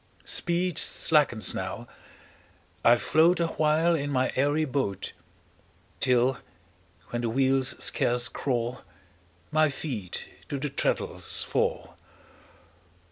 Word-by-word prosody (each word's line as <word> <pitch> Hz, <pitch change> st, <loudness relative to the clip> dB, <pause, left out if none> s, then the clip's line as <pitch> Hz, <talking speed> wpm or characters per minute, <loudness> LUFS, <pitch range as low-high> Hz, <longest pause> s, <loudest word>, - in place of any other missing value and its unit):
Speed 175 Hz, 0 st, 0 dB
slackens 145 Hz, -8 st, +3 dB
now, -, -, -5 dB, 1.0 s
I 120 Hz, -, +7 dB
float 160 Hz, -, +3 dB
Awhile 160 Hz, 0 st, +2 dB
in 145 Hz, -3 st, -1 dB
my 130 Hz, -2 st, +1 dB
airy 145 Hz, +4 st, +2 dB
boat; 130 Hz, -9 st, -2 dB, 0.9 s
Till, 125 Hz, 0 st, +2 dB, 0.7 s
when 120 Hz, -, -2 dB
the 120 Hz, -, -1 dB
wheels 130 Hz, +1 st, +1 dB
scarce 120 Hz, 0 st, +1 dB
crawl, 120 Hz, -2 st, -2 dB, 0.7 s
My 155 Hz, 0 st, +3 dB
feet 125 Hz, -, -5 dB, 0.2 s
to 140 Hz, -, -2 dB
the 140 Hz, +1 st, -3 dB
treadles -, -, -1 dB
fall. -, -, -2 dB
135 Hz, 100 wpm, -27 LUFS, 120-155 Hz, 1.0 s, I